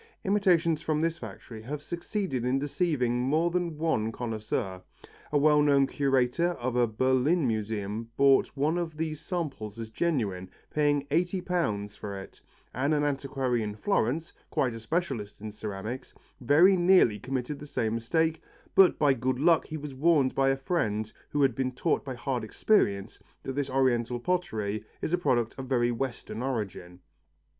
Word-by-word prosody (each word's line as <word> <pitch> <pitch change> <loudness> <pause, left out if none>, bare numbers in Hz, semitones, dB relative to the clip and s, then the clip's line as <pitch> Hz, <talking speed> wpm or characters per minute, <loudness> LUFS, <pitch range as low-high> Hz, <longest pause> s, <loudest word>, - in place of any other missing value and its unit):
Imitations 180 -5 +2
from 155 -1 0
this 165 0 0
factory 110 +1 -9
have 140 +6 -5
succeeded 170 - -3
in 125 +2 +1
deceiving 135 -4 0
more 155 +7 +1
than 170 -3 -1
one 130 -9 0
connoisseur. 110 -5 -3 0.5
A 150 - +3
well 150 +1 +5
known 140 -2 +4
curator 135 +5 +1
of 125 -5 -3
a 120 -1 +3
Berlin 130 +8 +2
museum 110 -1 -2
bought 140 0 +4
one 155 +5 +1
of 160 -3 -4
these 155 -1 -3
samples 140 - -4
as 115 -1 -6
genuine, 105 - -1 0.2
paying 145 -2 +2
eighty 175 +4 +1
pounds 105 - -2
for 100 -1 -6
it, 95 - -12 0.3
and 140 +5 +1
an 145 - +1
antiquary 135 -4 -1
of 105 0 -5
Florence, 165 - 0 0.2
quite 125 -3 0
a 115 - -7
specialist 115 - -3
in 105 +1 -6
ceramics, 110 +4 -6 0.2
very 155 +10 +5
nearly 175 - +4
committed 130 +4 -3
the 150 - -9
same 115 -5 -1
mistake, 160 +8 0 0.3
but 190 -2 +6
by 145 -2 +4
good 130 0 -1
luck 165 +4 +3
he 155 - -5
was 150 -2 -7
warned 140 -1 +3
by 135 0 +2
a 135 - +1
friend 110 - -1 0.2
who 145 -1 +1
had 135 -3 +3
been 130 +1 -1
taught 155 +6 0
by 130 -2 -5
hard 125 -1 -2
experience 105 - +1 0.2
that 135 - -4
this 140 0 -2
Oriental 125 -2 +1
pottery 110 - -2 0.2
is 160 - -3
a - - +4
product 120 -9 +1
of 130 - -5
very 120 -2 +2
Western 120 -1 -4
origin. 100 -8 -4
135 Hz, 165 wpm, -28 LUFS, 115-160 Hz, 0.5 s, but